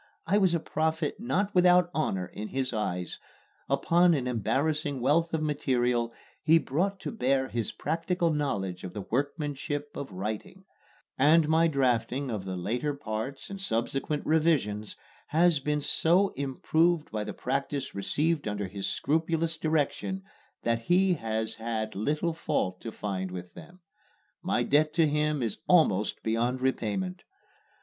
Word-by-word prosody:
I 200 +5 +3
was 185 -4 +3
a - - +1
prophet 160 0 -1
not 205 -3 0
without 180 -1 +5
honor 95 -12 0
in 105 +4 -7
his 130 0 -2
eyes. 90 -5 -3 0.5
Upon 175 0 +4
an 130 -4 -1
embarrassing 140 +5 0
wealth 155 +7 +2
of 160 -1 -1
material 125 -5 +1 0.3
he 160 +2 +5
brought 185 +7 -1
to - - -4
bear 135 - +1
his 115 -3 -2
practical 165 +2 -1
knowledge 100 -12 -2
of 90 - -6
the 105 - -5
workmanship 145 +2 -2
of 140 - -6
writing; 105 - -5 0.5
and 155 +3 +5
my 160 +1 +4
drafting 130 -2 0
of 105 -4 -4
the 95 -1 -4
later 120 +11 -1
parts 135 - -5
and 195 -1 -6
subsequent 135 +1 -1
revisions 150 -10 +1 0.3
has 165 0 +3
been 150 +1 -1
so 175 +6 +3
improved 155 +4 +1
by 105 -1 -2
the - - -5
practice 140 +1 -2
received 150 +10 0
under 105 -1 -2
his 95 +1 -4
scrupulous 165 +1 0
direction 160 +5 -1 0.4
that 115 0 +1
he 180 +7 +3
has 110 -6 -2
had 110 -1 -3
little 150 - 0
fault 145 - -1
to 115 - -5
find 95 -3 -3
with 90 -1 -8
them. 180 +1 -13 0.6
My - - +1
debt 155 +1 +2
to 165 -2 +4
him 150 -2 0
is 110 -3 -3
almost 130 - +3
beyond 120 +3 0
repayment. 130 - -1
145 Hz, 145 wpm, -28 LUFS, 115-165 Hz, 0.6 s, without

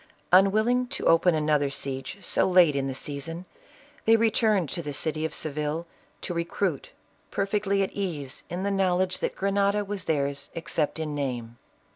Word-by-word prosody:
Unwilling 215 +7 +4
to - - -4
open 165 +1 +5
another 150 -2 +2
siege 135 +5 -3
so - - +2
late 175 -5 +5
in 135 -1 0
the 135 - -4
season, 165 +6 -5 0.6
they 225 - +6
returned 220 -5 +2
to 170 - -4
the 145 -3 -5
city 155 +2 -1
of 160 - -3
Seville, 155 +2 -2 0.4
to 180 - -4
re 170 0 0
cruit, 170 -3 -2 0.4
perfectly 200 0 0
at 190 - -3
ease 155 -9 -4
in 180 +2 -3
the 200 - 0
knowledge 185 -1 +1
that - - -2
Grenada 200 +1 +1
was 200 -2 -4
theirs 140 -2 -1
except 165 -2 -2
in 155 -2 -3
name. 120 -5 -4
170 Hz, 165 wpm, -27 LUFS, 145-195 Hz, 0.6 s, they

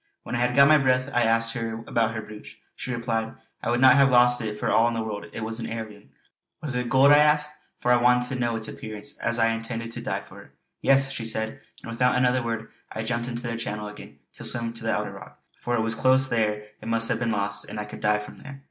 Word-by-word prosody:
When - - -7
I 120 - 0
had 125 0 +1
got 140 0 +7
my 155 0 +6
breath 130 0 +1
I 120 - +3
asked 115 0 +2
her 115 -1 -4
about 115 -1 0
her 110 - -4
brooch. 105 0 -12 0.2
She 125 - -5
replied: 115 -2 -2 0.3
"I - - -2
would 120 +1 +1
not 130 0 +7
have 140 -1 +6
lost 125 -1 +5
it 105 -1 -4
for - - 0
all 115 +1 +4
the 115 -1 -2
world. 105 -2 -5
It 115 - -6
is 110 +1 -4
an - - -4
heirloom." 110 -2 -7 0.5
"Was 140 -5 -3
it 125 -1 -1
gold?" 135 +3 +6
I 145 - +8
asked, 150 0 +3 0.2
for 125 - 0
I 120 -1 +4
wanted 125 0 +3
to 130 - -3
know 120 -1 0
its 110 -1 -2
appearance 110 +6 -7
as 115 0 -1
I 115 -1 +3
intended 115 0 -5
to - - -7
dive - - -3
for - - -13
it. - - -18 0.3
"Yes!" 135 0 +4
she 115 - -4
said, 110 0 -1 0.2
and 115 - -7
without 125 +2 +2
another 125 0 +2
word 115 -1 -4 0.2
I 110 - -4
jumped 120 +1 -2
into 120 -1 -5
the 115 0 -2
channel 105 -3 -4
again 105 -8 -12 0.2
to - - -11
swim 115 -1 -3
to 115 0 -9
the 115 - 0
outer - - -2
rock, - - -13 0.2
for 120 - -1
it 115 - +1
was 115 0 -1
close 130 +3 +3
there 105 -2 0 0.2
it - - -9
must 115 0 +2
have 120 -2 0
been 120 -1 0
lost 100 -1 -2
and - - -6
I 105 - -4
could 105 - -10
dive 105 0 +1
from - - -12
there. 140 -1 -11
115 Hz, 265 wpm, -25 LUFS, 110-125 Hz, 0.5 s, I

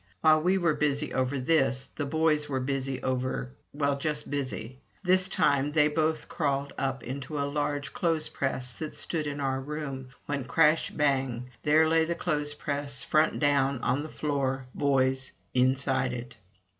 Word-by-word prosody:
While 155 0 +5
we 185 +4 +3
were 170 -4 +2
busy 150 0 0
over 130 +2 0
this, 135 -2 +2
the 145 - -2
boys 155 -1 +2
were 135 -2 0
busy 135 0 -2
over 125 - -1 0.5
just 150 0 -2
busy. 130 -3 -4 0.2
This 185 0 +4
time 140 -5 +2
they 150 -1 +5
both 155 0 0
crawled 140 -3 -1
up 135 -2 -2
into 135 +3 -5
a 140 - 0
large 145 0 -2
clothes 165 -3 0
press 130 -2 -2
that 155 -1 -5
stood 155 -3 -3
in 145 0 -4
our 135 -1 -1
room, 140 -2 -5 0.2
when, 140 -3 -2
crash! 155 +3 +3
bang! 130 -4 0
there 155 +2 +4
lay 160 0 +4
the 170 +1 -1
clothes 150 -4 -2
press, 145 -2 -2
front 155 +1 +2
down, 140 -2 +2
on 130 +3 +1
the 155 - -6
floor, 135 -4 -1
boys 135 -2 +1 0.2
inside 130 0 +2
it. 120 0 -7
140 Hz, 160 wpm, -28 LUFS, 130-155 Hz, 0.5 s, While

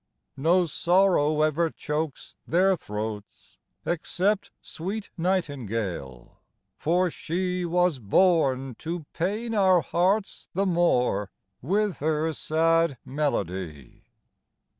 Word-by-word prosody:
No 175 +6 +3
sorrow 170 -2 +3
ever 160 +2 +2
chokes 150 -1 -4
their 190 +3 +3
throats, 105 - -7 0.3
Except 190 +4 0
sweet 200 +6 -6
nightingale; 115 - -3 0.4
for 175 +2 +2
she 180 +2 -2
Was 175 -3 +1
born 135 - +2
to 165 -1 -4
pain 210 +7 -2
our 190 -4 +4
hearts 190 +6 0
the 195 +2 +1
more 125 - +2 0.3
With 200 - 0
her 155 +1 0
sad 165 -1 +2
melody. 95 - -3
165 Hz, 95 wpm, -26 LUFS, 135-185 Hz, 0.4 s, our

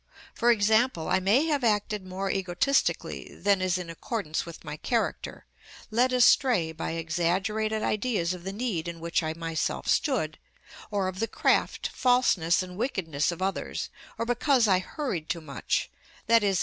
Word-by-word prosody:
For 240 - +2
example, 220 -4 +3
I - - +3
may 210 +11 +3
have 295 -5 0
acted 210 -3 0
more 190 +1 -2
egotistically 195 +9 0
than 200 -2 +2
is 185 -1 +1
in 180 -2 -5
accordance 165 -1 -3
with 170 - -10
my 150 0 -5
character, 235 - -2 0.5
led 245 +4 +3
astray 245 -8 +4
by 160 0 -4
exaggerated 190 +7 -1
ideas 210 -6 0
of 180 -1 -9
the 190 - -4
need 200 -6 -2
in 170 -1 -6
which 170 +1 0
I 155 -1 -2
myself 165 -1 -2
stood, 210 - +1 0.5
or 200 -3 0
of 185 0 -5
the 225 - 0
craft, - - +1
falseness, 225 -10 +3
and 180 0 -9
wickedness 175 - -1
of 170 +2 -5
others, 195 0 -2 0.3
or 230 - -1
because 245 0 +3
I 185 -2 +4
hurried 185 - -4
too 170 0 -1
much, 140 -7 -2 0.4
_i.e. 210 -4 +4
195 Hz, 160 wpm, -27 LUFS, 170-230 Hz, 0.5 s, astray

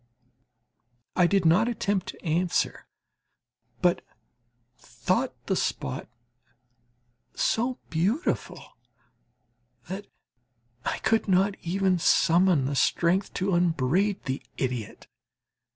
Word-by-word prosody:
I 180 -2 +5
did 195 -1 +2
not 180 +8 +5
attempt 205 -5 -1
to - - -9
answer, 170 +2 0 1.0
but - - +3 0.7
thought - - -2
the - - 0
spot 65 - -2 1.3
so 245 +3 0
beautiful 190 - -2 1.1
that 195 +2 -6 0.8
I - - -1
could 225 0 +2
not 195 +1 +3
even 185 +1 +1
summon 170 -3 +4
the 140 +1 -2
strength 175 +7 +2
to 190 +1 0
upbraid 175 +3 +1
the 135 0 -3 0.2
idiot. 125 -5 -4
180 Hz, 90 wpm, -27 LUFS, 160-200 Hz, 1.3 s, I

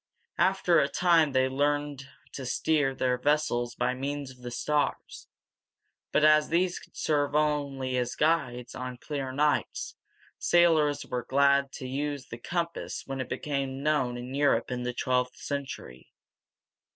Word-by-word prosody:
After 185 -2 +4
a 140 - +3
time 170 -4 +3
they 130 0 +3
learned 145 0 -1 0.2
to 135 - -6
steer 135 +2 +1
their 125 -1 0
vessels 125 -4 +1
by - - 0
means 140 +1 -4
of 125 - -17
the 125 - -6
stars; 145 +4 -2 0.8
but - - +2
as 155 0 +5
these 175 +2 +1
could - - -17
serve 145 -1 0
as 135 -5 0
guides 130 -6 0
only 125 - -5
on 125 - -9
clear 135 0 -4
nights, 150 +3 0 0.4
sailors 160 -4 +3
were 125 -1 -3
glad 140 +1 +3
to 130 - -6
use 140 +1 -3
the 115 - -7
compass 170 +5 -3
when 135 -1 -4
it 130 - -6
became 135 -2 -3
known 130 -5 +1
in 125 +2 -7
Europe, 140 -4 +2
in 125 0 -2
the 125 0 -2
twelfth 125 -1 0
century. 135 - -6
140 Hz, 150 wpm, -28 LUFS, 130-150 Hz, 0.8 s, as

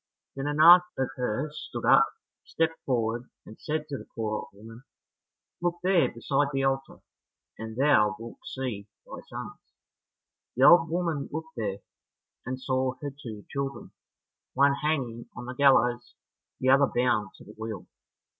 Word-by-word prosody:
Then 135 +1 -3
an 145 +1 -2
aunt 175 +3 +10 0.2
of 130 -1 0
hers 135 +5 -3
stood - - -5
up, - - +6 0.4
stepped 165 0 -1
forward, 120 -1 -1 0.2
and 110 - -13
said 155 0 -3
to 140 -3 -5
the - - -12
poor 110 -2 -2
old 105 - -4
woman, 115 +4 -13 0.8
"Look 175 0 0
there 185 -2 +3
beside 140 +4 0
the 135 -1 -1
altar, 135 0 -2 0.6
and 110 0 -7
thou 115 -7 +4
wilt 115 +1 -10
see 120 -7 -5 0.2
thy - - -9
sons." - - -8 1.0
The 130 - +2
old 165 -2 +7
woman 165 -4 -2
looked 160 +1 -6
there, 105 -4 -3 0.7
and 130 +1 -3
saw 130 0 -1
her 145 - -3
two 115 -7 -10
children, 140 0 -4 0.6
one 140 +1 +5
hanging 135 -6 -2
on 125 - -7
the 125 - -6
gallows, 125 -3 +3 0.4
the 130 - +1
other 135 +1 +6
bound 120 -6 0
to - - -15
the - - -13
wheel. 110 -3 -6
130 Hz, 155 wpm, -27 LUFS, 115-145 Hz, 1.0 s, aunt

